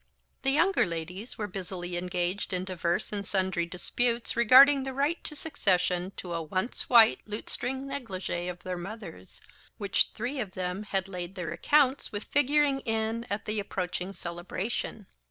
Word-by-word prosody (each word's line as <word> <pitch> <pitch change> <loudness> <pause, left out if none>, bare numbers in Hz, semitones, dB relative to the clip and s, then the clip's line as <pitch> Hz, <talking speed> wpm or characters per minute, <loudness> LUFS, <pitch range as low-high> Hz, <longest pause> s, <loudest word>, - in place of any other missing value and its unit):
The 270 - +1
younger 340 +8 +4
ladies 175 +8 -5
were 215 - -2
busily 180 -2 -5
engaged 180 +2 -1
in 180 0 0
divers 175 0 -1
and 200 -1 -2
sundry 190 -3 0
disputes 235 +7 -1
regarding 265 +4 +8
the 265 0 -4
right 290 +5 0
to 300 - -1
succession 185 - +1
to 175 -2 -5
a 165 - -1
once 185 +9 -2
white 230 -3 +7
lutestring 250 +5 -3
negligee 195 -10 -4
of 180 0 -8
their 180 -1 -4
mother's, 190 - -9 0.4
which 200 -1 +1
three 250 +5 -3
of 210 -6 -4
them 185 +1 -2
had 195 -1 0
laid 180 -1 -6
their 175 -4 -4
accounts 275 - +2
with 205 -1 -4
figuring 290 0 +3
in 225 -1 -2
at 200 +1 -3
the 215 0 -1
approaching 185 -1 -3
celebration. 190 +4 -4
200 Hz, 155 wpm, -29 LUFS, 180-245 Hz, 0.4 s, regarding